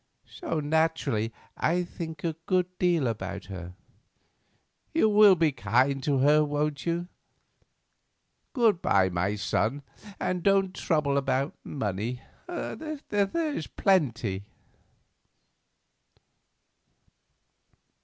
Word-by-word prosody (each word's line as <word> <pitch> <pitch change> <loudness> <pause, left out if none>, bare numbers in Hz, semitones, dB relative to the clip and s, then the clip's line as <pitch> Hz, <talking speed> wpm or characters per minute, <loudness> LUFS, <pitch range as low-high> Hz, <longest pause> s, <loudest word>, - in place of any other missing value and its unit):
So 330 - -4
naturally 150 -7 0 0.2
I 175 +3 +1
think 160 -3 -7
a 165 -2 -1
good 185 -1 +3
deal 175 -5 +2
about 100 -4 -4
her. 90 -1 -8 1.2
You 325 - +4
will 210 -2 +7
be 165 -3 +2
kind 130 +3 +1
to 140 +1 +1
her, 150 +3 +5
won't 150 0 -2
you? 170 +1 -1 1.5
Good 225 - +3
bye, 95 -1 +3
my 90 +3 -1
son, 110 +7 -1 0.4
and 180 -1 -1
don't 195 0 +2
trouble 150 -6 0
about 135 +1 -1
money; 110 -1 -3 0.3
there's 305 - -2
plenty." 120 - +1
150 Hz, 95 wpm, -27 LUFS, 120-180 Hz, 1.5 s, will